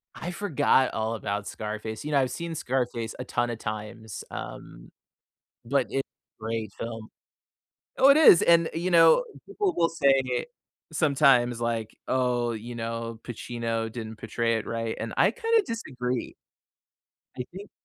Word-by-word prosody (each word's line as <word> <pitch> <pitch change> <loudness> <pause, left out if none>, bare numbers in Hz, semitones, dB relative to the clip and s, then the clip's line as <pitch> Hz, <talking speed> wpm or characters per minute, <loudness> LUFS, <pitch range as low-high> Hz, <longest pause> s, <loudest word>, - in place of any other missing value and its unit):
I 175 - -5
forgot 170 -8 +2
all 110 +1 -1
about 100 -1 -3
Scarface, 110 0 -5
you 150 - -4
know, 145 - +4
I've 130 -2 +1
seen 170 +5 -4
Scarface 120 -5 -2
a - - -4
ton 120 -1 -1
of 115 -1 -4
times, 110 -1 -6
um, - - -9 0.7
but 130 0 +1
it's 135 - 0 0.4
a - - -13
great 110 -2 -3
film. 115 -1 -6 0.9
Oh, 270 - +7
it 280 - +7
is! 305 - +8
And, 170 -1 +5
you 175 +3 -1
know, 165 - +6 0.2
people 400 -1 -1
will 165 -1 +3
say 135 -6 +2 0.5
sometimes, 135 -6 +3
like, 115 -2 -2
"Oh," 125 -2 +1
you 115 +2 -6
know, 115 0 -4
"Pacino 115 -1 -3
didn't 110 -2 -6
portray 115 +1 -1
it 110 - -4
right." 115 -1 -3
And - - -5
I - - +5
kinda 455 -2 +2
disagree. 125 - -3 1.0
I 125 - -2
think 200 +3 -10
120 Hz, 150 wpm, -27 LUFS, 115-150 Hz, 1.0 s, is